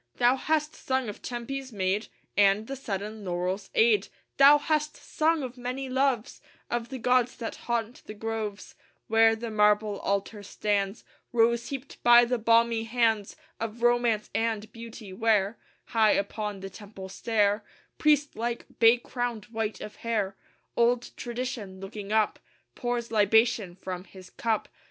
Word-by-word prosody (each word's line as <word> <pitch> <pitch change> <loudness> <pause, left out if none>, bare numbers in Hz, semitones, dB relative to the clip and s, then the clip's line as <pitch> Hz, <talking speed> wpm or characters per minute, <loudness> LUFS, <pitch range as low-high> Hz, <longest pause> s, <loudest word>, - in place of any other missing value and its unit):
Thou 245 +1 +4
hast 305 +2 0
sung 260 -3 -1
of 205 - -8
Tempe's 260 +2 -5
maid, 200 +1 -1 0.3
And 200 +1 +4
the 275 - -5
sudden 210 -3 -5
laurel's 185 +2 -2
aid. 220 -3 +4 0.3
Thou 280 +2 +8
hast 300 0 -1
sung 315 -1 0
of 255 0 -7
many 255 +2 -4
loves 260 -3 0 0.3
Of 235 0 -2
the 265 - -5
gods 250 0 +2
that 230 -2 -5
haunt 235 0 -2
the 215 - -7
groves 215 -1 -4 0.3
Where 225 0 +5
the 225 0 -6
marble 210 -1 +3
altar 200 +2 -2
stands 205 0 -1 0.3
Rose 235 0 +2
heaped 275 -1 -7
by 240 0 +7
the 245 0 -1
balmy 230 0 +3
hands 225 -3 +1 0.2
Of 225 +1 -5
Romance 240 -3 +2
and 225 -1 -1
Beauty; 230 -3 -9
where, 215 0 +1 0.3
High 220 -2 +3
upon 205 0 -2
the 195 0 -7
temple 200 -1 -10
stair, 205 +1 +1 0.4
Priest 295 -1 +3
like, 235 +1 -3
bay 230 +1 +7
crowned, 245 -2 -4
white 220 -2 -3
of 210 - -8
hair, 210 -4 -1 0.4
Old 240 +1 +2
Tradition, 240 -6 -5
looking 200 +1 -7
up, 220 -1 +2 0.3
Pours 240 -1 -3
libation 220 -3 +3
from 185 -1 -6
his 185 -2 -14
cup. 225 -2 -1
225 Hz, 145 wpm, -28 LUFS, 205-245 Hz, 0.4 s, Thou